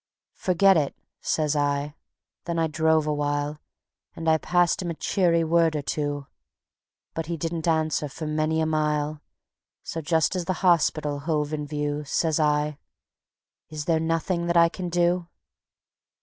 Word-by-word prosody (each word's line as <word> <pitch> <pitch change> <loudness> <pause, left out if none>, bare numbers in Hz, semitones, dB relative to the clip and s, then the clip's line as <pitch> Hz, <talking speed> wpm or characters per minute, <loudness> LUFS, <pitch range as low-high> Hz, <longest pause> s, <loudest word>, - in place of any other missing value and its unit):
"Forget 190 +1 +4
it," 145 -3 0 0.3
says 155 -1 0
I; 145 0 0 0.5
then 170 -1 -2
I 165 - +2
drove 160 0 +2
awhile, 145 0 -1 0.6
And 165 - -5
I 160 0 +4
passed 175 +2 +2
him 175 - -3
a 165 - -3
cheery 170 -2 +2
word 165 -1 +3
or 145 - -2
two; 145 0 -2 0.9
But 165 -1 -4
he 170 0 -3
didn't 165 +1 -3
answer 155 -2 +1
for 155 +4 -7
many 155 +1 0
a - - +2
mile, 150 -1 0 0.6
So 165 - -4
just 160 +3 +1
as 180 -2 -2
the 185 - 0
hospital 155 -4 +2
hove 150 0 -1
in 150 -1 -3
view, 145 0 -2
Says 160 +2 0
I: 150 -1 +1 0.9
"Is 150 -1 -5
there 165 -2 +2
nothing 165 +2 -1
that 170 0 +2
I 170 0 +6
can 180 0 -5
do?" 175 0 +1
160 Hz, 155 wpm, -25 LUFS, 150-170 Hz, 0.9 s, I